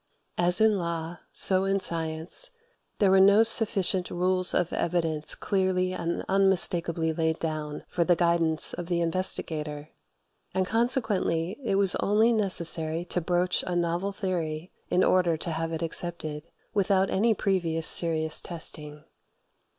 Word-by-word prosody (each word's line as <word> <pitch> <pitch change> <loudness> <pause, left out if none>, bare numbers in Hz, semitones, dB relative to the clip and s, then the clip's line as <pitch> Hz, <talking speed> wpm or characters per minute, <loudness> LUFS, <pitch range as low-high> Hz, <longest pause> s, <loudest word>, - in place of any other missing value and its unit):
As 175 +2 +5
in 220 -2 +3
law, 170 0 -5
so 190 -1 +5
in 195 0 0
science, 165 - +1 0.5
there 200 -2 +2
were 190 - +5
no 200 +3 +6
sufficient 200 -5 +1
rules 185 +1 0
of 175 -1 -1
evidence 165 -3 -2
clearly 185 -1 -1
and 170 -1 -4
unmistakably 175 -4 +1
laid 160 0 -1
down 155 -2 -5
for 175 - -1
the 175 +1 +2
guidance 170 -2 +1
of 175 - -6
the 175 -1 -1
investigator; 160 -4 -3 0.7
and 190 0 +1
consequently 215 - 0
it 215 - -1
was 195 -2 +3
only 220 +3 +2
necessary 170 -5 +1
to 180 - -2
broach 180 +2 -1
a 180 - -2
novel 175 +3 -1
theory 175 -4 -4 0.2
in 180 - +2
order 175 -3 +2
to 170 - -4
have 165 +1 -3
it 165 0 -4
accepted, 165 -2 -3 0.3
without 195 -1 +1
any 220 +3 +1
previous 170 -5 -1
serious 160 -2 +2
testing. 150 -3 -6
175 Hz, 140 wpm, -26 LUFS, 165-190 Hz, 0.7 s, no